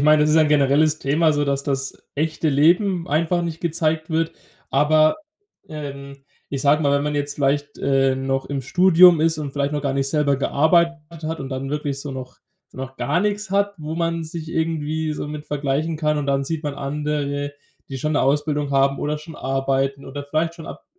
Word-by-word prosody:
ich -, -, 0 dB
meine, 150 Hz, 0 st, +5 dB
das 150 Hz, -, +2 dB
ist 155 Hz, -, +4 dB
ein 155 Hz, -1 st, +5 dB
generelles 150 Hz, +2 st, +3 dB
Thema, 155 Hz, +3 st, +2 dB
so, 145 Hz, 0 st, 0 dB
dass 140 Hz, -1 st, -1 dB
das 135 Hz, -1 st, -3 dB
echte 155 Hz, +1 st, -1 dB
Leben 175 Hz, +5 st, +3 dB
einfach 170 Hz, +4 st, +1 dB
nicht 165 Hz, -1 st, -4 dB
gezeigt 160 Hz, -1 st, 0 dB
wird. 165 Hz, 0 st, 0 dB, 0.4 s
Aber, 155 Hz, +2 st, +4 dB, 0.5 s
ähm, 140 Hz, -2 st, -8 dB, 0.3 s
ich 135 Hz, -1 st, -3 dB
sage 145 Hz, +2 st, +3 dB
mal, 140 Hz, -1 st, +2 dB
wenn 140 Hz, 0 st, +2 dB
man 150 Hz, 0 st, -2 dB
jetzt 145 Hz, 0 st, -1 dB
vielleicht, 145 Hz, 0 st, 0 dB
äh, 135 Hz, -1 st, +2 dB
noch 135 Hz, 0 st, -2 dB
im 140 Hz, -1 st, -3 dB
Studium 180 Hz, +3 st, +6 dB
ist 160 Hz, -1 st, +2 dB
und 145 Hz, -3 st, -4 dB
vielleicht 140 Hz, 0 st, -1 dB
noch 150 Hz, -, -1 dB
gar 140 Hz, -2 st, -1 dB
nicht 135 Hz, 0 st, 0 dB
selber 145 Hz, -1 st, +1 dB
gearbeitet 165 Hz, +2 st, +1 dB
hat 160 Hz, 0 st, -3 dB
und 135 Hz, -, -5 dB
dann 135 Hz, +1 st, -4 dB
wirklich 145 Hz, -2 st, -3 dB
so 145 Hz, -, -6 dB
noch 130 Hz, -1 st, -8 dB, 0.3 s
so -, -, -20 dB
noch 130 Hz, 0 st, -6 dB
gar 150 Hz, +5 st, 0 dB
nix 205 Hz, 0 st, -1 dB
hat, 200 Hz, +1 st, +1 dB
wo 155 Hz, +1 st, -5 dB
man 165 Hz, 0 st, -1 dB
sich 160 Hz, 0 st, -7 dB
irgendwie 160 Hz, -1 st, -1 dB
so 150 Hz, -, -5 dB
mit 150 Hz, 0 st, -7 dB
vergleichen 145 Hz, +3 st, -1 dB
kann. 150 Hz, -1 st, 0 dB
Und 145 Hz, -, -3 dB
dann 140 Hz, 0 st, +1 dB
sieht 160 Hz, +2 st, -3 dB
man 145 Hz, -2 st, -3 dB
andere, 145 Hz, 0 st, -3 dB, 0.4 s
die 135 Hz, -, -5 dB
schon 155 Hz, +4 st, -1 dB
'ne 145 Hz, -, +2 dB
Ausbildung 145 Hz, +1 st, 0 dB
haben 140 Hz, 0 st, +2 dB
oder 150 Hz, +1 st, -1 dB
schon 155 Hz, +1 st, -11 dB
arbeiten 135 Hz, +1 st, -1 dB
oder 145 Hz, +1 st, -7 dB
vielleicht 160 Hz, +3 st, -1 dB
schon 165 Hz, -2 st, -10 dB
ab -, -, -9 dB
150 Hz, 210 wpm, -22 LUFS, 140-160 Hz, 0.5 s, Studium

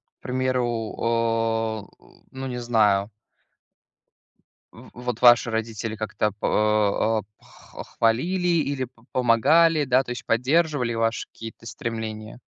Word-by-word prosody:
К -, -, -55 dB
примеру, 130 Hz, -1 st, 0 dB, 0.3 s
о, 115 Hz, -2 st, 0 dB
э, -, -, -23 dB, 0.3 s
ну, 135 Hz, 0 st, -6 dB
не 125 Hz, -, -4 dB
знаю 110 Hz, -4 st, +2 dB, 1.6 s
в -, -, -14 dB
вот 125 Hz, 0 st, -3 dB
ваши 120 Hz, -1 st, +6 dB
родители 110 Hz, 0 st, -3 dB
как-то 110 Hz, -1 st, -2 dB
па 105 Hz, +1 st, +1 dB
э 105 Hz, +2 st, -30 dB
х -, -, -12 dB
хвалили 175 Hz, +11 st, +1 dB, 0.2 s
или 135 Hz, -2 st, -2 dB
п 115 Hz, -1 st, -25 dB
помогали, 145 Hz, +6 st, +4 dB
да, 130 Hz, 0 st, +3 dB
то 130 Hz, -, -10 dB
есть 125 Hz, -, -6 dB
поддерживали 130 Hz, 0 st, +1 dB
ваши 115 Hz, 0 st, -1 dB
какие-то 115 Hz, 0 st, -11 dB
стремления? 110 Hz, 0 st, -6 dB
115 Hz, 125 wpm, -24 LUFS, 110-130 Hz, 1.6 s, ваши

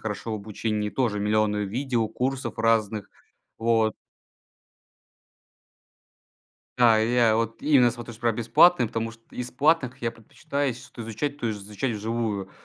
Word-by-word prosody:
хорошо 110 Hz, +1 st, -4 dB
в -, -, -1 dB
обучении. 105 Hz, 0 st, -3 dB
Тоже 110 Hz, -5 st, 0 dB
миллионы 105 Hz, 0 st, +1 dB
видео, 120 Hz, +1 st, -1 dB
курсов 130 Hz, -1 st, -3 dB
разных. 110 Hz, -2 st, +1 dB, 0.5 s
Вот. 115 Hz, -1 st, +2 dB, 2.9 s
Да, 115 Hz, -3 st, +6 dB
и 115 Hz, +2 st, 0 dB
я 115 Hz, -3 st, +4 dB
вот 115 Hz, 0 st, -2 dB
именно 135 Hz, -5 st, +5 dB
смотрю 120 Hz, 0 st, -8 dB
чтоб 115 Hz, -, -15 dB
прям 115 Hz, -2 st, +1 dB
бесплатные, 120 Hz, +6 st, +5 dB
потому 115 Hz, +1 st, -3 dB
что 115 Hz, 0 st, -17 dB
из 125 Hz, 0 st, -5 dB
платных 140 Hz, -2 st, +2 dB
я 115 Hz, -, 0 dB
предпочитаю 125 Hz, +5 st, -4 dB
если 125 Hz, -1 st, -5 dB
что-то 120 Hz, -, -10 dB
изучать, 140 Hz, +6 st, -4 dB
то 115 Hz, -5 st, -1 dB
изучать 105 Hz, +4 st, -4 dB
вживую. 105 Hz, -3 st, -2 dB
115 Hz, 140 wpm, -25 LUFS, 110-125 Hz, 2.9 s, Да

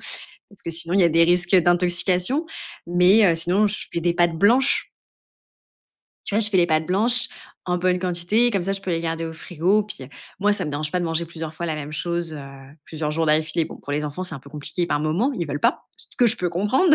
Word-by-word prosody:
parce 200 Hz, -, -6 dB
que 170 Hz, -, -3 dB
sinon, 165 Hz, +1 st, 0 dB
il 195 Hz, -, +4 dB
y -, -, +5 dB
a -, -, +5 dB
des 165 Hz, +1 st, +4 dB
risques 175 Hz, +2 st, +2 dB
d'intoxication. 180 Hz, -, +2 dB, 0.4 s
Mais 180 Hz, +5 st, +4 dB
heu, -, -, +1 dB
sinon, 180 Hz, +6 st, +3 dB
je 210 Hz, +1 st, -2 dB
fais 170 Hz, -, -2 dB
des 170 Hz, 0 st, 0 dB
pâtes 175 Hz, -2 st, +1 dB
blanches 245 Hz, +8 st, +3 dB, 1.4 s
tu -, -, -4 dB
vois, 215 Hz, -, +3 dB
je 215 Hz, -1 st, +3 dB
fais 195 Hz, -, +1 dB
des 175 Hz, -2 st, +4 dB
pâtes 155 Hz, -1 st, 0 dB
blanches 230 Hz, +7 st, +4 dB, 0.4 s
en 180 Hz, -1 st, 0 dB
bonne 180 Hz, 0 st, +1 dB
quantité 185 Hz, +6 st, +1 dB
comme 200 Hz, -5 st, -1 dB
ça, 195 Hz, +3 st, -2 dB
je 195 Hz, -, -3 dB
peux 190 Hz, -, -5 dB
les 165 Hz, -1 st, -1 dB
garder 165 Hz, 0 st, -3 dB
au 160 Hz, -, -7 dB
frigo, 180 Hz, +6 st, 0 dB
puis, 200 Hz, -10 st, -9 dB
heu, -, -, -13 dB, 0.3 s
moi 205 Hz, +1 st, +3 dB
ça 205 Hz, -, 0 dB
me 150 Hz, -, -4 dB
dérange 150 Hz, +1 st, -3 dB
pas 180 Hz, -, -1 dB
de 175 Hz, -, -2 dB
manger 165 Hz, 0 st, -2 dB
plusieurs 160 Hz, -1 st, -8 dB
fois 170 Hz, +2 st, -5 dB
la 160 Hz, -, -2 dB
même 150 Hz, 0 st, -7 dB
chose, 170 Hz, +1 st, -3 dB
heu, 155 Hz, -, -7 dB, 0.5 s
plusieurs 155 Hz, -1 st, -4 dB
jours 160 Hz, +1 st, -1 dB
d'affilée. 155 Hz, +1 st, +1 dB
Bon, -, -, -10 dB
pour 145 Hz, -, -8 dB
les 150 Hz, +1 st, -2 dB
enfants, 150 Hz, +5 st, -5 dB
c'est 180 Hz, -3 st, -5 dB
un -, -, -7 dB
peu 140 Hz, +2 st, -16 dB
compliqué 150 Hz, +4 st, -4 dB
par 145 Hz, -, -1 dB
moment, 160 Hz, -, 0 dB
ils 170 Hz, -8 st, -4 dB
veulent 145 Hz, 0 st, -4 dB
pas, -, -, 0 dB
ce -, -, -9 dB
que 245 Hz, -, +4 dB
je 230 Hz, +1 st, +2 dB
peux 180 Hz, -, -2 dB
comprendre. 210 Hz, -, +2 dB
175 Hz, 250 wpm, -22 LUFS, 160-195 Hz, 1.4 s, y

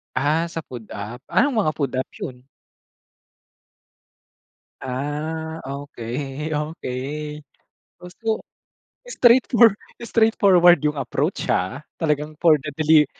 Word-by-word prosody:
Ah, 150 Hz, +5 st, +2 dB
sa 165 Hz, -1 st, -5 dB
food 120 Hz, -7 st, -10 dB
app, 105 Hz, +4 st, -7 dB
anong 260 Hz, -2 st, +2 dB
mga 155 Hz, -8 st, +2 dB
food 140 Hz, -4 st, -2 dB
app 130 Hz, -, -2 dB
yun? 125 Hz, -1 st, -7 dB, 2.4 s
Ah, 150 Hz, +5 st, -4 dB
okey 140 Hz, +1 st, -5 dB
okey 150 Hz, 0 st, -4 dB, 0.6 s
gusto 220 Hz, +5 st, -3 dB, 0.7 s
straight 255 Hz, -, +4 dB
for 235 Hz, -2 st, +7 dB
straightfor 210 Hz, +3 st, -13 dB
straightforward 195 Hz, -7 st, +5 dB
yung 150 Hz, -1 st, 0 dB
approach, 130 Hz, -4 st, -2 dB
ha. 95 Hz, +9 st, 0 dB, 0.2 s
Talagang 150 Hz, -1 st, -1 dB
for 160 Hz, -3 st, +6 dB
the 150 Hz, +2 st, -6 dB
deli 155 Hz, 0 st, +5 dB
150 Hz, 110 wpm, -22 LUFS, 135-175 Hz, 2.4 s, for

